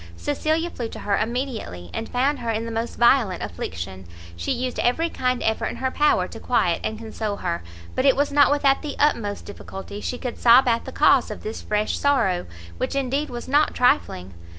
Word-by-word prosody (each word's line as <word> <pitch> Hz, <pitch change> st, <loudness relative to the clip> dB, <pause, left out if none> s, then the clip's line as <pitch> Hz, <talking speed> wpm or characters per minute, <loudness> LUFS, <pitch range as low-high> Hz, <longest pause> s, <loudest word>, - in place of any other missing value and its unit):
Cecilia 315 Hz, -, -1 dB
flew 235 Hz, -2 st, -5 dB
to -, -, -8 dB
her 200 Hz, -, +1 dB
immediately, 225 Hz, -, -3 dB
and 225 Hz, -, -4 dB
found 270 Hz, +4 st, +1 dB
her 235 Hz, -, -4 dB
in 225 Hz, 0 st, -1 dB
the 230 Hz, -, -5 dB
most 230 Hz, +1 st, -3 dB
violent 235 Hz, -6 st, +3 dB
affliction. 90 Hz, +2 st, -6 dB, 0.3 s
She 85 Hz, 0 st, -3 dB
used 250 Hz, 0 st, -2 dB
every 325 Hz, +8 st, +1 dB
kind 250 Hz, -1 st, -1 dB
effort 220 Hz, 0 st, 0 dB
in -, -, -5 dB
her 260 Hz, 0 st, -2 dB
power 300 Hz, +2 st, +2 dB
to -, -, -9 dB
quiet -, -, +1 dB
and 220 Hz, -, -2 dB
console 220 Hz, -2 st, -4 dB
her, 170 Hz, -3 st, -3 dB, 0.3 s
but 255 Hz, -, 0 dB
it 270 Hz, -, +5 dB
was 285 Hz, +1 st, +1 dB
not 285 Hz, 0 st, +5 dB
without 280 Hz, -1 st, +3 dB
the 295 Hz, -2 st, -5 dB
utmost 230 Hz, -9 st, 0 dB
difficulty 200 Hz, 0 st, -8 dB
she 250 Hz, -, -3 dB
could 250 Hz, -2 st, -5 dB
sob 245 Hz, +2 st, +7 dB
out 230 Hz, -1 st, +1 dB
the -, -, -6 dB
cause -, -, +4 dB
of -, -, -7 dB
this 215 Hz, -, -5 dB
fresh 210 Hz, 0 st, -1 dB
sorrow, 235 Hz, -11 st, +1 dB, 0.3 s
which -, -, -2 dB
indeed 275 Hz, +2 st, -1 dB
was 240 Hz, -1 st, -6 dB
not 290 Hz, +3 st, +2 dB
trifling. 90 Hz, -, +1 dB
235 Hz, 200 wpm, -23 LUFS, 205-275 Hz, 0.3 s, sob